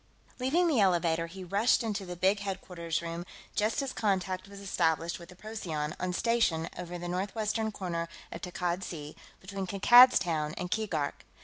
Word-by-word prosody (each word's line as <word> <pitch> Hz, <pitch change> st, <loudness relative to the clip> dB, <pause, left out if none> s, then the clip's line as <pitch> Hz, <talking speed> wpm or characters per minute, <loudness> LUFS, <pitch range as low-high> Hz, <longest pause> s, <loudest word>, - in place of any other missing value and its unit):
Leaving 310 Hz, +8 st, +2 dB
the 295 Hz, -8 st, +3 dB
elevator, 170 Hz, -4 st, +2 dB
he 185 Hz, +3 st, -9 dB
rushed 205 Hz, +7 st, +2 dB
into 205 Hz, -4 st, -3 dB
the 180 Hz, -, -5 dB
big 190 Hz, +4 st, +2 dB
headquarters 180 Hz, -4 st, -3 dB
room 170 Hz, +1 st, -4 dB, 0.3 s
just 215 Hz, +6 st, +1 dB
as 270 Hz, -, -4 dB
contact 190 Hz, -2 st, -1 dB
was 200 Hz, 0 st, -11 dB
established 170 Hz, -4 st, 0 dB
with 170 Hz, -, -12 dB
the 180 Hz, -, -12 dB
Procyon, 170 Hz, -8 st, -4 dB
on 185 Hz, 0 st, -1 dB
station 180 Hz, -6 st, +1 dB
over 180 Hz, 0 st, -6 dB
the 175 Hz, 0 st, -5 dB
northwestern 210 Hz, +4 st, -1 dB
corner 170 Hz, -4 st, -3 dB, 0.2 s
of -, -, -7 dB
Takkad 180 Hz, 0 st, -2 dB
Sea, 150 Hz, -4 st, -7 dB, 0.2 s
between 195 Hz, 0 st, -5 dB
Kankad's 240 Hz, +7 st, +8 dB
Town 155 Hz, -3 st, -1 dB
and 180 Hz, -1 st, -4 dB
Keegark. 170 Hz, -10 st, -1 dB
185 Hz, 170 wpm, -30 LUFS, 170-210 Hz, 0.3 s, Kankad's